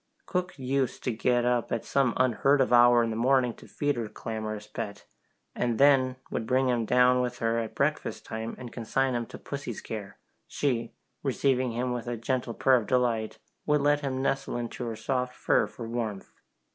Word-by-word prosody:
Cook 180 -2 -2
used 130 -1 -1
to 125 - 0
get 120 +2 +1
up 120 -1 +1
at 115 - -2
some 135 -4 +1
unheard 130 +3 +3
of 130 -2 +2
hour 120 0 +7
in 115 - -1
the - - -3
morning 125 +1 +3
to - - -15
feed 145 -2 -1
her 115 -2 -3
clamorous 110 -2 -5
pet, 105 -1 -6 0.5
and 120 -2 -1
then 135 -2 +5 0.2
would 110 - -3
bring 130 +1 +2
him 120 -2 +1
down 125 +1 +4
with 125 -1 -2
her 115 0 0
at 115 -1 -5
breakfast - - -1
time 110 +1 -5
and 125 -2 -9
consign 130 +3 0
him 120 -1 -2
to - - -9
pussy's 140 -5 -6
care; 105 -3 -7 0.3
she, 120 -5 -1 0.3
receiving 130 -2 +1
him 125 +2 -1
with 120 -1 -5
a 120 -1 -2
gentle 120 0 -2
purr 130 -1 +4
of 110 -4 -3
delight, 120 -3 +1 0.3
would 150 -1 +3
let 145 +1 +3
him 135 -2 -2
nestle 135 -2 -1
into 120 +1 -4
her 115 - -3
soft 125 +2 -2
fur - - +2
for 115 - -8
warmth. 115 -4 -4
125 Hz, 195 wpm, -28 LUFS, 115-130 Hz, 0.5 s, hour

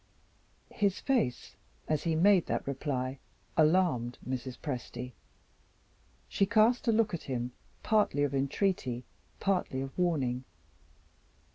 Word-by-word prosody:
His 200 -3 +1
face, 195 - 0 0.3
as 155 0 0
he 165 -1 +2
made 185 +2 +5
that - - -1
reply, 135 -1 -2 0.4
alarmed 155 -7 +3
Mrs. 130 0 -4
Presty. 125 -3 -5 1.2
She 195 - +1
cast 230 +4 +3
a - - +6
look 220 -2 +2
at 170 - -2
him, 125 -1 -2 0.3
partly 210 -9 +2
of 145 -1 0
entreaty, 135 -2 0 0.4
partly 185 -9 0
of 135 0 -5
warning. 135 -8 +1
150 Hz, 115 wpm, -31 LUFS, 130-195 Hz, 1.2 s, a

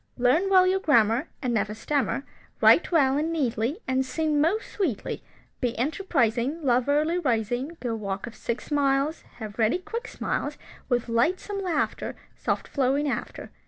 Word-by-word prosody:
Learn 265 +10 +3
well 370 -1 +6
your 375 +1 +2
grammar, 240 - +3 0.2
And 250 -2 0
never 210 -1 0
stammer, 275 +3 -1 0.4
Write - - +5
well 280 -4 +4
and 320 +2 -1
neatly, 265 - -1
And 260 0 +2
sing 300 +2 0
most 365 +8 0
sweetly, 320 - -2 0.4
Be 245 -3 -1
enterprising, 270 - 0
Love 250 0 +2
early 310 +4 +2
rising, 250 - -1
Go 240 -2 -2
walk 200 -2 -4
of 235 - -9
six 235 +5 -5
miles, 280 +2 +1 0.2
Have 215 -1 -8
ready 225 +7 +3
quick 455 +5 -6
smiles, - - -3 0.3
With 245 -2 +1
lightsome 360 - 0
laughter, 360 -3 -1 0.2
Soft - - -2
flowing 280 +2 +1
after. - - -4
275 Hz, 155 wpm, -26 LUFS, 235-325 Hz, 0.4 s, well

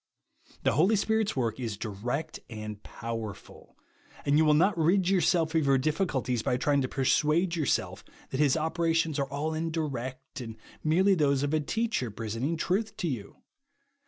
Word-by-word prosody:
The - - +3
Holy 190 +8 +4
Spirit's 220 +1 +1
work 115 -3 -1
is 115 -5 -3
direct 120 +10 -4
and 105 -2 -7
power 115 -3 -5
ful; - - -17 0.5
and 140 - +3
you 155 - +5
will 150 -1 +5
not 190 +6 +4
rid 175 +3 +3
yourself 175 -4 +2
of 160 -1 +3
your 135 -1 +5
difficulties 130 - 0
by 125 - 0
trying 140 +2 +2
to 130 - 0
persuade 150 +7 +2
yourself 155 -5 -1 0.3
that 130 - -2
his 150 -1 +4
operations 165 -1 0
are 135 -1 -1
all 150 +3 -2
indirect, 140 -6 -4
and 115 -2 -7 0.3
merely 185 +6 +4
those 140 -5 +2
of 145 +1 -1
a 155 - +3
teacher 215 - -1
presenting 115 +9 -3
truth 200 +7 -1
lo 170 - +1
you. 105 -6 -6
150 Hz, 165 wpm, -29 LUFS, 125-165 Hz, 0.5 s, you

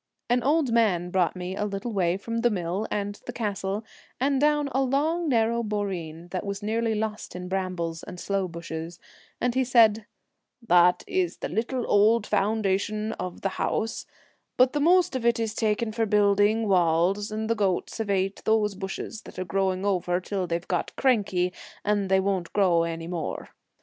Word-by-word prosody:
An 245 0 +3
old 290 0 +2
man 180 -7 +2
brought 185 -1 +1
me 180 +1 -5
a 205 - -2
little 210 +3 -3
way 180 -2 +1
from 230 +3 -4
the 240 +1 +3
mill 190 +1 -2
and 205 0 -3
the - - -3
castle, 205 -2 -3 0.3
and 275 +1 +1
down 295 -1 +3
a 270 - +1
long, 305 +6 +1
narrow 230 -1 +2
boreen 185 -6 -4
that 185 0 -3
was 200 0 -5
nearly 225 +1 0
lost 215 -2 -4
in 180 0 -6
brambles 180 -3 -3
and 180 - -9
sloe 195 0 -1
bushes, 165 0 -7 0.4
and 245 -1 0
he 260 +1 +2
said, 225 -4 +4 0.3
' 230 - -27
That 180 0 +5
is 180 -2 -1
the - - -4
little 235 +5 -2
old 210 +2 +4
foundation 210 +1 0
of 180 -1 -5
the 195 - 0
house, 225 - -1 0.5
but 255 0 +5
the 295 - 0
most 355 0 +4
of 255 - -2
it 235 -1 +2
is 225 -2 -1
taken 220 0 0
for 225 0 0
building 205 +2 +3
walls, 185 +3 +2
and 220 +1 -3
the 230 - +2
goats 200 -1 -1
have 220 -2 -2
ate 195 0 0
those 215 -2 +2
bushes 195 +3 -6
that - - -12
are 185 - -3
growing 190 +1 0
over 180 -3 +1
it 185 - -6
till 190 -2 -2
they've 170 +1 -3
got 180 - -2
cranky, 200 -8 +1 0.3
and 205 -2 +1
they 190 0 +4
won't 190 -3 -1
grow 180 -5 +3
any 165 0 -3
more. 170 -2 -4
205 Hz, 185 wpm, -26 LUFS, 185-230 Hz, 0.5 s, That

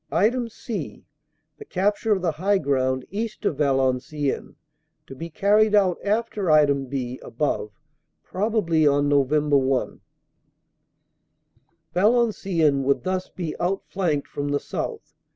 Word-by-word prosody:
"(c) 225 0 -6 0.6
The 430 - -9
capture 205 - 0
of 190 -3 +2
the 170 - +2
high 190 +6 +1
ground 130 -4 0
east 220 +2 -4
of 145 - 0
Valenciennes 135 +1 0 0.5
to - - -10
be 165 +5 -7
carried 210 +5 +3
out 190 -4 +3
after 215 0 -1 0.5
(b) 130 -2 -4
above, 120 -4 -2 0.5
probably 185 -6 +1
on 145 0 +3
Nov. 140 -2 +3
1. 140 -3 +1 1.9
"Valenciennes 190 - +2
would 140 +1 +1
thus 185 0 -2
be 170 -4 -5
outflanked 175 -4 -1
from 145 0 -4
the 145 0 +1
south. - - -5
165 Hz, 115 wpm, -24 LUFS, 140-200 Hz, 1.9 s, carried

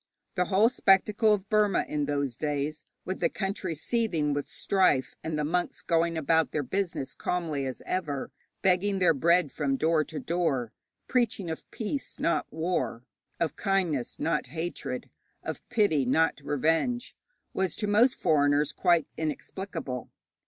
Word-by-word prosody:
The 180 - +1
whole 200 +4 +4
spectacle 210 -1 +3
of 205 -1 +1
Burma 210 -2 +3
in 150 -1 -1
those 140 -3 -1
days, 150 +1 -2 0.2
with 185 - -3
the 170 - +2
country 195 -4 -3
seething 165 -6 0
with 145 0 -3
strife, 185 -9 +2
and 160 -1 -2
the 150 - 0
monks 175 +4 -1
going 165 0 +1
about 160 -1 +2
their 150 - -1
business 170 -2 -2
calmly 160 -6 -2
as 130 - -6
ever, 150 -7 -2 0.3
begging 195 +1 +3
their 180 -3 +4
bread 170 +1 +3
from 140 -2 0
door 160 +1 +3
to 155 - -6
door, 150 -9 -1 0.4
preaching 225 -8 0
of 160 - -7
peace, 245 +6 -4
not 170 - 0
war, 160 -8 -2 0.4
of 165 -2 0
kindness, 180 - 0
not 160 -3 0
hatred, 165 +6 -4 0.4
of - - -5
pity, 205 - +3
not 155 +5 +2
revenge, 165 - 0 0.4
was 190 -4 0
to - - -2
most 220 +5 +4
foreigners 145 0 +3
quite 170 -2 +3
inexplicable. 160 -3 -4
165 Hz, 145 wpm, -28 LUFS, 150-195 Hz, 0.4 s, whole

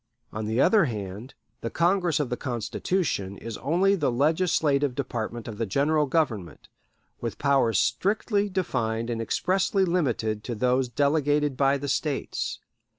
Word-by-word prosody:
On 110 0 -3
the 110 +3 0
other 195 +5 +5
hand, 105 0 -6 0.3
the 115 - -3
Congress 175 -1 +1
of 140 -4 -2
the - - +1
Constitution 120 - -2
is 115 -2 -7
only 185 +6 +2
the 150 -9 +1
legislative 145 -1 +2
department 120 -4 -4
of 110 -3 -7
the 115 - -1
General 150 +7 +2
Government, 120 - -2 0.5
with 115 -3 -4
powers 135 -7 +2
strictly 200 - +1
defined 120 - -1
and 115 -1 -2
expressly 190 - +1
limited 120 - 0
to 120 - -3
those 125 +3 +1
delegated 145 +1 +1
by 135 +1 +3
the 140 +1 -5
States. 145 +1 -2
135 Hz, 145 wpm, -26 LUFS, 115-160 Hz, 0.5 s, other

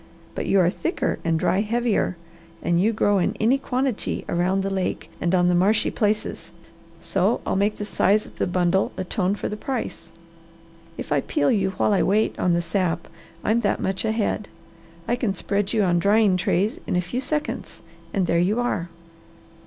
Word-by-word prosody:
But - - -4
you 195 - +4
are 175 -2 +4
thicker 335 - -2
and 165 -1 +1
dry 190 - +2
heavier, 225 -4 0 0.5
and 170 +1 +2
you 215 +4 +3
grow 205 -2 +2
in 175 - 0
any 245 +5 +3
quantity 260 -3 -2
around 185 +3 +1
the 195 - -2
lake 190 -1 -3
and 175 +1 +2
on 175 -1 +3
the 180 - +3
marshy 195 +5 +3
places, 215 -1 -1 0.5
so - - +1
I'll - - 0
make 205 +2 +1
the 210 - -4
size 210 +1 +2
of - - -15
the - - +1
bundle 180 +1 +1
atone 185 +1 -1
for - - -4
the 210 - -4
price. 255 +1 -5 0.9
If - - -7
I 145 -1 +3
peel 145 - +1
you 195 -3 +2
while 210 - +2
I 195 - +3
wait 210 +3 +2
on 180 - +2
the 170 0 +1
sap 170 -1 -1 0.4
I'm 225 +2 +2
that 205 -4 0
much 190 0 -2
ahead. 220 -2 -1 0.6
I 240 - +2
can 235 -6 -1
spread 200 +2 -1
you 220 -3 +2
on 175 -2 +2
drying 205 +1 +4
trays 185 +3 0
in - - 0
a 180 - +2
few 180 +9 -3
seconds 300 +2 -3 0.3
and 195 -3 +1
there 170 0 +2
you 200 +7 +2
are. 210 -8 -1
195 Hz, 190 wpm, -23 LUFS, 180-215 Hz, 0.9 s, you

